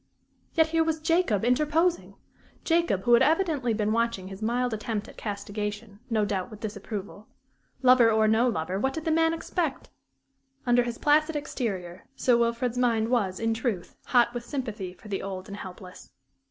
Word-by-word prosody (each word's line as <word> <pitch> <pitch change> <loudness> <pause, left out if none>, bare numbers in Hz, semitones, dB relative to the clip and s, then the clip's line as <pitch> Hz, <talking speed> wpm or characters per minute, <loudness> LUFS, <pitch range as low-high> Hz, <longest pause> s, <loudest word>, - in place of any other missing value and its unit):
Yet 320 -1 +4
here 325 0 +2
was 320 -1 -1
Jacob 315 - +1
interposing! 305 +7 +1 0.5
Jacob, 330 - +1
who 240 - +4
had 235 - +7
evidently 315 -7 +2
been 215 -1 0
watching 230 -5 -1
his 195 +1 -9
mild 240 +2 0
attempt 215 -1 -3
at - - -13
castigation, 205 0 -5
no 220 -3 +2
doubt 195 -1 -2
with 215 -3 -11
disapproval. 205 -1 -6 0.6
Lover 250 -2 +7
or 220 0 +3
no 225 +3 +3
lover 185 -2 -2
what 265 +4 0
did 320 +1 -5
the 320 - +1
man 325 0 +3
expect? 330 -2 -3 0.7
Under 245 0 +4
his 240 -1 -3
placid 305 +1 +3
exterior, 195 -11 -4
Sir 250 -3 +3
Wilfrid's 235 +1 0
mind 230 -2 +2
was, 200 -7 0
in 225 0 +1
truth, 225 -6 -3
hot 240 -1 +3
with 240 -1 -4
sympathy 225 -9 -4
for 185 - -15
the 195 -2 -3
old 190 -1 -6
and 200 - -7
helpless. 185 -1 -10
230 Hz, 170 wpm, -27 LUFS, 205-270 Hz, 0.7 s, had